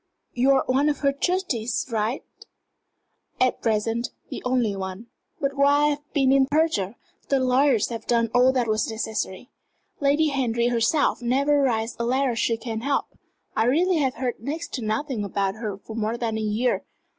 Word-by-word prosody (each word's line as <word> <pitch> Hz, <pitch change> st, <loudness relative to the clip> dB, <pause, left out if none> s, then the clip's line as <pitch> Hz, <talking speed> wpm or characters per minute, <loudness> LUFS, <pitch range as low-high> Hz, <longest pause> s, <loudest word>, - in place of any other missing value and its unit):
You're 265 Hz, +2 st, +3 dB
one 275 Hz, +4 st, +2 dB
of 290 Hz, -, -2 dB
her 280 Hz, -1 st, +3 dB
trustees, 275 Hz, -, -1 dB
aren't 220 Hz, +4 st, -1 dB, 0.2 s
you?" -, -, -15 dB, 1.0 s
"At -, -, -4 dB
present, 225 Hz, +1 st, 0 dB, 0.2 s
the -, -, -5 dB
only 250 Hz, -5 st, +1 dB
one. 190 Hz, +4 st, -6 dB, 0.3 s
But 275 Hz, 0 st, -1 dB
while 280 Hz, +1 st, +4 dB
I 295 Hz, -, +4 dB
have 295 Hz, 0 st, -5 dB
been 270 Hz, -2 st, +3 dB
in 270 Hz, -1 st, +4 dB
Persia 275 Hz, -, +1 dB, 0.3 s
the 275 Hz, -, +3 dB
lawyers 255 Hz, -2 st, +3 dB
have 230 Hz, -2 st, -6 dB
done 230 Hz, -2 st, +2 dB
all 250 Hz, +1 st, +5 dB
that 250 Hz, -3 st, 0 dB
was 215 Hz, 0 st, 0 dB
necessary. 220 Hz, +1 st, -4 dB, 0.5 s
Lady 290 Hz, +2 st, +3 dB
Henry 240 Hz, -4 st, 0 dB
herself 245 Hz, +5 st, +1 dB
never 280 Hz, +4 st, +2 dB
writes 230 Hz, -3 st, 0 dB
a -, -, 0 dB
letter 255 Hz, 0 st, +1 dB
she 230 Hz, 0 st, +1 dB
can 225 Hz, -1 st, -5 dB
help. 275 Hz, +2 st, -1 dB, 0.4 s
I 220 Hz, -, +2 dB
really 340 Hz, +8 st, +3 dB
have 265 Hz, -3 st, 0 dB
heard 250 Hz, -1 st, -3 dB
next 300 Hz, +9 st, -5 dB
to 255 Hz, -, -3 dB
nothing 220 Hz, +2 st, -2 dB
about 195 Hz, -1 st, -1 dB
her 215 Hz, -4 st, -4 dB
for 220 Hz, +2 st, -10 dB
more 225 Hz, +1 st, -1 dB
than 230 Hz, -2 st, -2 dB
a 220 Hz, -, -2 dB
year. 215 Hz, +4 st, 0 dB
245 Hz, 180 wpm, -24 LUFS, 225-275 Hz, 1.0 s, all